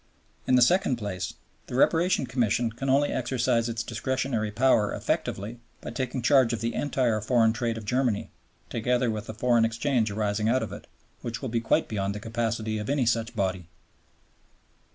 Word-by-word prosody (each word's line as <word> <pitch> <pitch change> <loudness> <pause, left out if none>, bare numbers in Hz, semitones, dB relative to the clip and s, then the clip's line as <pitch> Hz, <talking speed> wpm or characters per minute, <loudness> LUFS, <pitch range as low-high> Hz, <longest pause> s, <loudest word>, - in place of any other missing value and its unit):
In 130 - +4
the 125 - +6
second 175 -1 +3
place, 100 -6 -4 0.3
the - - -6
Reparation 165 +3 +3
Commission 120 -1 0
can 135 +4 -4
only 140 +2 +3
exercise 120 -2 0
its 115 0 -3
discretionary 120 -2 -2
power 110 -1 +3
effectively 110 +5 -2 0.2
by - - -7
taking 125 0 -3
charge 130 -2 +4
of 115 - -2
the 115 0 -2
entire 125 -6 0
foreign 115 0 +3
trade 115 0 -2
of 110 - -7
Germany, 125 -2 0 0.4
together 125 +1 +1
with 110 0 -5
the 110 - -6
foreign 120 0 +3
exchange 115 0 +1
arising 105 +1 0
out 130 +2 +2
of - - -6
it, - - -10 0.3
which 120 +3 -5
will 130 - -2
be 115 0 0
quite 115 - +2
beyond 100 -2 -2
the - - -4
capacity 110 -1 -2
of 105 - -5
any 140 -3 +1
such 115 0 0
body. 95 -3 -1
115 Hz, 175 wpm, -27 LUFS, 110-125 Hz, 0.4 s, the